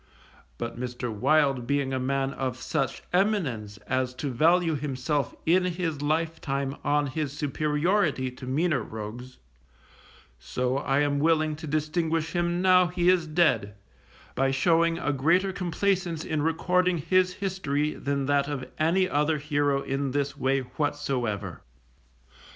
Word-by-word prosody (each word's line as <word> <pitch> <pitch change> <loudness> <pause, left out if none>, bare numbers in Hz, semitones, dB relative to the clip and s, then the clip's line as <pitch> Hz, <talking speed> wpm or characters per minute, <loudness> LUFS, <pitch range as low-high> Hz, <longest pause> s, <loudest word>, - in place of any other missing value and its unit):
But 120 0 -5
Mr. 125 -2 -4
Wild 135 +2 +2
being 140 -1 0
a 130 - 0
man 135 +1 -1
of 130 -2 -3
such 130 0 -2
eminence 155 - 0
as 130 0 -1
to 140 +1 -3
value 165 +6 +3
himself 145 0 -2
in 180 +3 +4
his 170 -5 -2
life 160 +2 -1
time 140 0 -2
on 145 0 +2
his 145 0 -3
superiority 150 0 0
to 125 0 -10
meaner 150 +1 +1
rogues; 110 +4 -8 1.0
so 125 - -1
I 140 0 +1
am 145 -1 +1
willing 155 0 +2
to 155 - -8
distinguish 160 +2 -1
him 175 +1 0
now 185 -1 +6
he 175 0 +1
is 180 -3 +3
dead, 155 - +2 0.6
by 135 +1 +1
showing 165 +4 +2
a 145 - -1
greater 175 +8 +2
complaisance 180 -2 -1
in 155 -2 -1
recording 180 +3 +1
his 180 +4 +2
history 155 -7 -1
than 140 -1 -2
that 140 0 +2
of 135 -3 -4
any 175 +4 +3
other 150 -1 +1
hero 145 -1 0
in 135 +1 -2
this 140 0 -1
way 135 -1 +1
whatsoever. 125 - -3
145 Hz, 140 wpm, -27 LUFS, 135-165 Hz, 1.0 s, now